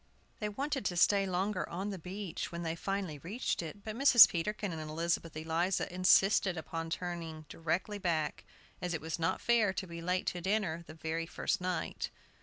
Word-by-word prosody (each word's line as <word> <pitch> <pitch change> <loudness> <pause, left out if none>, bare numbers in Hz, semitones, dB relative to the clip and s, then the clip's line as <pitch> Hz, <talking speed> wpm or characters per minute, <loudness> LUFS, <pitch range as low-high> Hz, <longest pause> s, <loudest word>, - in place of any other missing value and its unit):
They 210 - -1
wanted 275 +5 -2
to 180 - -1
stay 195 +2 +4
longer 185 +1 -1
on 190 +4 -3
the 195 - -5
beach, 185 +1 -5
when 170 0 -4
they 165 0 -2
finally 190 -4 -3
reached 205 - -2
it; 170 +5 -8
but 215 -1 -5
Mrs. 255 -2 +9
Peterkin 205 +3 -2
and 160 - -5
Elizabeth 165 +1 -2
Eliza 165 +4 0
insisted 190 0 +4
upon 165 0 -4
turning 165 -2 -4
directly 180 +5 -2
back, 160 -5 -1 0.4
as 180 -1 -1
it - - -2
was 160 +2 -4
not 165 - 0
fair 225 -5 +3
to 190 - -3
be 170 -1 -7
late 180 +2 0
to 175 - -5
dinner 190 -3 0
the 155 - -10
very 160 +1 -3
first - - -1
night. 180 -2 -2
180 Hz, 185 wpm, -33 LUFS, 165-200 Hz, 0.4 s, Mrs